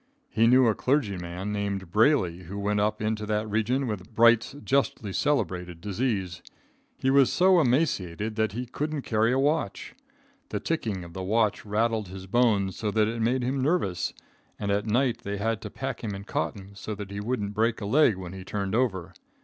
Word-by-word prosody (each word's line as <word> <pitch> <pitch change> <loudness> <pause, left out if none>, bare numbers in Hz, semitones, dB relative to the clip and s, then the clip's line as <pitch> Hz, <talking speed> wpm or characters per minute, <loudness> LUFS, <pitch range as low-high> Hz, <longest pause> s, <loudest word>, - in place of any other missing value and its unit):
He 115 +1 +3
knew 130 +2 +6
a 115 - +4
clergyman 100 -8 -1
named 100 -3 -3
Brayley 95 - +2
who 95 +4 -7
went 105 +1 0
up 105 +1 0
into 105 0 -1
that 105 0 0
region 110 +6 0
with 105 -1 -5
Bright's 115 +3 +4
justly 130 -7 0
celebrated 90 - -1
disease. 95 -3 -2 0.6
He 130 - +1
was 135 -1 +5
so 185 -1 +5
emaciated 110 - 0
that 110 -2 0
he 125 +3 -3
couldn't 150 +3 -3
carry 110 +1 +2
a 130 - +2
watch. 145 +4 0 0.6
The - - -2
ticking 110 - -2
of 85 -1 -11
the 95 - -5
watch 110 +3 +1
rattled 110 0 0
his 95 +1 -8
bones 100 -3 +2
so 110 - -1
that 105 0 +2
it 115 +1 -3
made 125 +3 +1
him 130 +2 -1
nervous, 130 - 0 0.5
and 100 -1 -2
at 100 +2 0
night 120 +1 +1
they 100 -4 -4
had 110 +1 -1
to 105 - -6
pack 135 +2 -5
him 105 -3 -3
in 100 - -7
cotton 100 -1 -4
so 105 +2 -6
that 100 -1 -7
he 100 - -4
wouldn't 105 -2 -2
break 115 +2 +1
a 105 - -5
leg 125 -2 +4
when 90 -1 -7
he 95 -1 -8
turned 100 0 -3
over. 95 -7 0
110 Hz, 190 wpm, -27 LUFS, 100-125 Hz, 0.6 s, knew